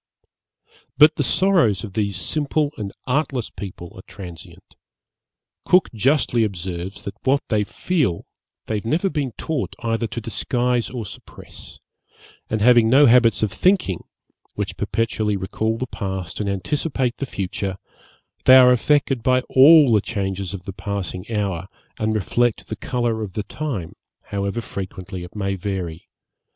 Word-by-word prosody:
But 150 +1 +7
the - - -1
sorrows 140 - +2
of 100 -4 -7
these 100 -3 -1
simple 150 +2 0
and 100 -2 -5
artless 130 -3 -1
people 90 -3 -8
are 95 - -11
transient. 90 -5 -11 0.9
Cook 180 -6 +3
justly 120 0 +2
observes, 95 -1 -4
that 100 - -5
what 135 +1 +2
they 105 -2 +2
feel 135 - -1 0.4
they 110 - -2
have 105 - -6
never 170 - +1
been 140 -5 -2
taught 155 -6 -3
either 115 0 0
to 120 - -5
disguise 120 +2 0
or 120 -4 -5
suppress; - - -12 0.7
and 110 -1 -1
having 120 -1 +6
no 140 +4 +7
habits 115 -3 +5
of 110 - +1
thinking, 180 - +1 0.5
which - - -3
perpetually 110 -2 -1
recall 110 +4 -2
the 130 - -2
past 95 -7 -5
and 105 -1 -1
anticipate 125 - -1
the 140 - -4
future, 95 -2 -4 0.7
they 130 - +9
are 125 -1 +8
affected 135 0 +2
by 130 +2 +3
all 140 0 +7
the 105 - +4
changes 95 -3 -3
of 90 - -9
the 95 - -7
passing 100 0 -5
hour, 95 -5 -2 0.3
and 110 0 0
reflect 120 +3 0
the 110 - -3
colour 120 0 -2
of 100 -4 -5
the 105 - -3
time, 105 - -5 0.3
however 100 +3 -3
frequently 95 -3 -7
it 90 - -11
may 100 -2 -1
vary. 90 -4 -5
110 Hz, 150 wpm, -22 LUFS, 95-130 Hz, 0.9 s, they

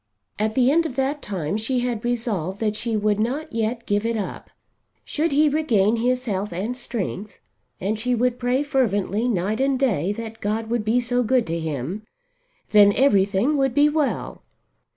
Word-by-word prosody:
At 215 +1 0
the 255 0 +4
end 330 +2 +3
of 260 - -8
that 275 +2 -1
time 185 -2 -3
she 245 +3 -1
had 240 -3 -2
resolved 215 -7 -2
that 215 -2 0
she 220 +1 -1
would 210 0 +1
not 285 +8 -2
yet 230 +1 -2
give 205 0 0
it 230 0 -1
up. 205 - -5 0.6
Should 315 +1 -1
he 300 +2 +4
regain 235 -8 +2
his 250 +2 0
health 205 -2 -2
and 200 +8 -3
strength, 215 -4 -5 0.4
and 210 +3 -2
she 250 +2 +1
would 245 +1 0
pray 250 +3 +1
fervently 225 -5 0
night 210 +3 -1
and 270 0 +2
day 205 - +1
that 225 0 -8
God 220 +2 -2
would 235 -2 0
be 225 +3 +2
so 245 +1 0
good 250 0 +2
to 165 0 -2
him, 160 - -4 0.7
then 205 -1 +7
everything 210 +2 +3
would 270 -3 +1
be 290 +1 +5
well. 300 -2 -2
230 Hz, 180 wpm, -23 LUFS, 205-255 Hz, 0.7 s, then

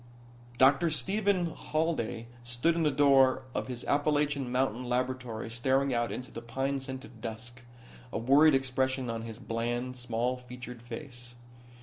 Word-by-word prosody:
Dr. 135 +6 +5
Stephen 190 +1 +1
Halday 155 -8 -1 0.2
stood 120 +7 +1
in 170 - -1
the 155 - +4
door 135 -2 +5
of - - -2
his 125 -1 -5
Appalachian 145 -3 +1
mountain 125 -1 0
laboratory 125 -2 -2
staring 130 +3 +1
out 120 0 0
into 125 0 -6
the 115 - -7
pine 135 +4 -2
scented 130 -4 -8
dusk, 120 +2 -7 0.5
a - - -2
worried 140 +6 +6
expression 130 -1 0
on 115 0 -4
his 115 -1 -7
bland, 120 +2 -2
small 125 0 -1
featured 125 -1 -9
face. 120 0 -9
130 Hz, 140 wpm, -30 LUFS, 120-140 Hz, 0.5 s, worried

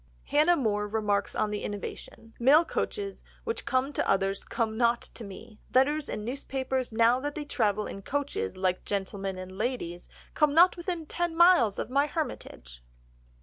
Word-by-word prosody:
Hannah 310 +4 +4
More 210 -5 0
remarks 205 -1 0
on 210 - 0
the 210 - -3
innovation: 225 +2 -7
"Mail 290 +7 +6
coaches, 400 +3 -3 0.2
which 455 0 -3
come 270 +1 0
to - - -1
others, 195 0 +1
come 225 -2 -2
not 235 0 +3
to 235 - -9
me; 215 +2 -11 0.2
letters 290 +3 +3
and 210 - -4
newspapers 260 0 -3
now 230 +3 +4
that 290 +2 -4
they 300 - -4
travel 215 -6 0
in 195 - -7
coaches, 285 - -3
like 185 -1 0
gentlemen 195 -1 -3
and 185 0 -7
ladies, 215 -8 -3 0.2
come 300 -2 +2
not 350 +3 +7
within 345 -2 -4
ten 345 +1 -2
miles 335 - +5
of - - -4
my 280 +2 +3
hermitage." 65 - -6
240 Hz, 165 wpm, -28 LUFS, 205-295 Hz, 0.2 s, not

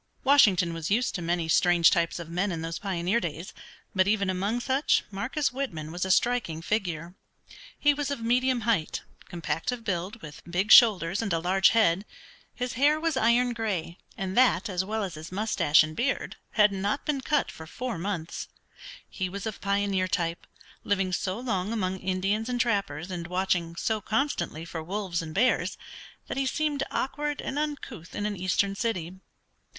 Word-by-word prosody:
Washington 200 - +5
was 165 0 -4
used 235 +5 +1
to 180 - -3
many 170 0 -1
strange 170 0 +5
types 170 -3 +1
of 170 -2 -7
men 180 +4 -1
in 165 -2 -4
those 165 0 -4
pioneer 190 +2 0
days, 170 -1 -5 0.4
but 185 0 +3
even 200 -2 +2
among 200 +6 -1
such 265 +4 +2
Marcus 265 +10 -1
Whitman 165 - -4
was 175 +2 -2
a - - -4
striking 185 -6 +1
figure. 175 -5 -2 0.6
He 290 0 +4
was 285 -1 -3
of 280 - -2
medium 250 +2 +1
height, 215 -8 0 0.3
compact 170 +4 -2
of 245 -2 -5
build, 195 +2 -3
with 150 -2 -9
big 190 +5 0
shoulders 200 -6 +7
and 215 -4 -2
a 165 - +2
large 185 +3 +4
head. 200 -5 +3 0.5
His 250 0 -3
hair 290 +5 +3
was 325 -2 0
iron 245 0 +3
gray, 195 -7 -3 0.2
and 190 -1 -3
that, 245 -2 +4
as 185 -1 0
well 215 +2 -2
as 190 -4 -4
his 155 +2 -9
moustache 190 -7 +3
and 155 0 -6
beard, 260 - -1 0.2
had 210 -1 +5
not 200 +7 -2
been 285 -3 -1
cut 295 +2 0
for 160 - -11
four 240 +3 -4
months. 170 -3 -4 0.6
He 185 -1 -3
was 200 +2 -6
of 220 -2 -5
pioneer 200 -2 +1
type, 170 -2 -2 0.4
living 195 -2 0
so 185 +3 -1
long 210 -5 -2
among 190 -4 -1
Indians 195 +5 -1
and 245 -1 -1
trappers, 200 - -1
and 170 -1 -4
watching 180 -2 0
so 215 +5 -1
constantly 220 - -1
for 165 -1 -5
wolves 185 0 -3
and 155 -1 -8
bears, 250 +6 +2 0.5
that - - -5
he 270 -1 +1
seemed 295 0 -1
awkward 295 +2 -2
and 280 - -3
uncouth 275 - -5
in 205 - -2
an 210 -1 -1
eastern 185 +2 +1
city. 190 -5 -3
195 Hz, 180 wpm, -27 LUFS, 175-235 Hz, 0.6 s, shoulders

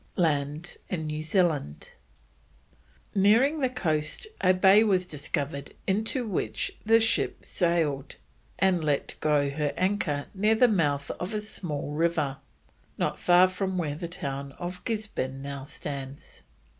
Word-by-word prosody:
LAND 150 0 0
IN 165 -4 -2
NEW 155 0 -3
ZEALAND. 155 - 0 1.2
Nearing 230 +10 +4
the 260 -3 +2
coast 155 - -1 0.2
a 185 - +6
bay 190 +3 +6
was 190 -4 +2
discovered 145 -2 -4
into 220 +6 +1
which 110 - -2
the 225 +1 +5
ship 225 - +1
sailed, 160 -6 0 0.4
and 185 -4 +2
let 145 -2 0
go 145 -2 +2
her 145 0 -1
anchor 185 -7 0
near 210 +3 +3
the 250 +3 +6
mouth 145 -9 +1
of 185 +4 -4
a - - 0
small 170 -9 -4
river, 155 -3 0 0.6
not - - -1
far 180 +1 +6
from 185 0 -2
where 155 -5 -1
the 170 +4 -5
town 140 -4 -4
of 180 +3 -6
Guisborne 210 - -3
now 140 -1 -6
stands. 140 -1 -7
170 Hz, 135 wpm, -27 LUFS, 145-195 Hz, 1.2 s, a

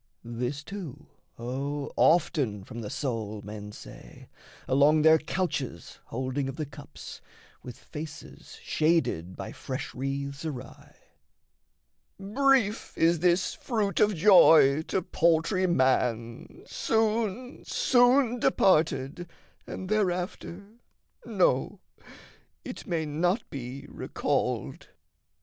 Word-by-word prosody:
This 125 +5 -4
too, 160 -7 -8 0.3
O 140 +4 -4
often 145 - +2
from 115 +4 -8
the 105 - -6
soul 110 -6 -4
men 105 0 -8
say, - - -13 0.4
Along 145 +3 +4
their 160 0 +6
couches 155 - -4
holding 130 +2 -3
of 135 - -6
the 155 - -3
cups, 145 0 -11 0.4
With 125 -2 -10
faces 150 -1 -10
shaded 155 - 0
by - - -7
fresh - - -6
wreaths 140 +2 -4
awry: 135 -5 -8 1.2
"Brief 225 +1 +1
is 165 0 +3
this 180 +2 +2
fruit 215 -6 -2
of 210 -1 +3
joy 160 -6 +6
to 190 - -1
paltry 170 +4 +2
man, 125 -6 0
Soon, 225 +2 -1
soon 245 0 +3
departed, 165 -4 +1 0.4
and 185 - -6
thereafter, 185 -2 -2 0.6
no, - - +1 0.9
It - - -8
may 165 -3 -1
not 175 +8 0
be 135 +1 -7
recalled." - - -3
155 Hz, 100 wpm, -28 LUFS, 130-190 Hz, 1.2 s, their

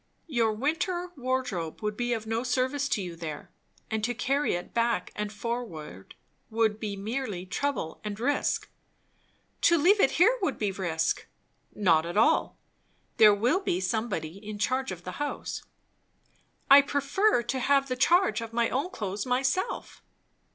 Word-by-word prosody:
Your 235 -8 +1
winter 345 - -1
wardrobe 250 - -3
would 210 0 -1
be 240 +2 -1
of 225 -2 -1
no 225 +1 -1
service 260 +3 0
to 205 - 0
you 175 -2 -6
there, 160 -3 -7 0.4
and 220 -1 -1
to 245 +2 0
carry 275 -1 +1
it 175 - -6
back 230 -6 0
and 210 -1 -3
forward 205 - -6 0.3
would 220 -1 +1
be 210 -2 -3
merely 210 -2 -4
trouble 195 - -3
and 210 -1 -5
risk." 280 +5 0 0.9
"To 340 - +5
leave 370 +7 +4
it 270 - +5
here 460 +9 +5
would 380 - 0
be 205 -2 0
risk." 165 -4 -1 0.5
"Not 170 -5 +3
at 175 - -4
all. 225 - +3 0.6
There 210 -2 +8
will 245 - +2
be 185 - -1
somebody 190 -4 -2
in 210 0 -7
charge 255 +2 0
of 180 -1 -7
the 180 - -7
house." 290 - -3 1.1
"I 280 +1 +9
prefer 285 - +1
to 260 +3 -2
have 275 +1 +3
the 255 - -2
charge 345 +3 +3
of 230 0 -7
my 235 0 +1
own 280 +8 -1
clothes 210 - -4
myself." 265 - -1
230 Hz, 160 wpm, -28 LUFS, 200-275 Hz, 1.1 s, I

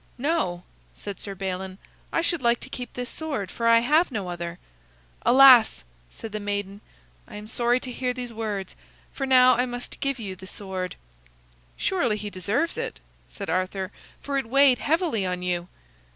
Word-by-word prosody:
"No," 255 - 0 0.3
said 200 -2 -7
Sir 200 -1 -6
Balin, 190 0 -4 0.3
"I - - +1
should 335 -2 +1
like 235 -1 +3
to - - -8
keep 250 -1 -6
this 245 0 -4
sword, 275 - -4
for 230 - -1
I 230 0 +6
have 310 +8 +3
no 205 -6 -3
other." 175 0 -5 0.7
"Alas!" 255 - +7 0.3
said 225 - -9
the 215 - -3
maiden, 205 0 -3 0.5
"I - - -11
am 210 0 -7
sorry 240 +3 +1
to 255 - -5
hear 250 0 -1
these 245 -1 -5
words, 210 -4 -4 0.4
for 270 - -3
now 255 -1 +7
I 250 +2 +1
must 245 0 -6
give 275 -1 -1
you 200 -5 -5
the 190 +1 -12
sword." 185 -2 -5 0.8
"Surely 255 - +1
he 210 -1 -6
deserves 210 - -1
it," - - -4 0.3
said - - -7
Arthur, 185 +1 -1 0.3
"for 280 -1 0
it 230 - -6
weighed 275 -1 +5
heavily 315 - +1
on 180 -1 -2
you." 175 -1 -1
225 Hz, 175 wpm, -25 LUFS, 190-255 Hz, 0.8 s, Alas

